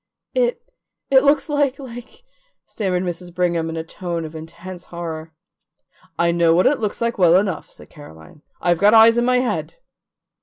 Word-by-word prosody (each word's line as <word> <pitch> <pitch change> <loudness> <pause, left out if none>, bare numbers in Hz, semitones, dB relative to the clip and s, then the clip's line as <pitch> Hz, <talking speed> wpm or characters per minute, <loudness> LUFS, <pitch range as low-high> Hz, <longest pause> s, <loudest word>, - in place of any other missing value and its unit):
"It 485 -1 0 0.5
it 265 -1 +7
looks 285 0 +3
like 285 -3 0
like 245 - -11 0.2
" - - -45
stammered 185 -4 -2
Mrs. 175 0 -5
Brigham 170 -2 0
in 165 - -5
a 160 - -3
tone 170 -1 -5
of 155 +1 -10
intense 170 +3 -10
horror. 165 -2 -7 0.9
"I 170 0 +2
know 170 -1 +3
what 180 - +3
it 295 - +3
looks 215 0 -3
like 235 -2 -1
well 175 -2 +5
enough," 185 -3 0
said - - -15
Caroline. 145 - -14 0.2
"I've 175 -1 +1
got 210 +2 +5
eyes 225 +1 +7
in 240 - +1
my 250 0 +3
head." 255 - -3
185 Hz, 180 wpm, -20 LUFS, 170-240 Hz, 0.9 s, it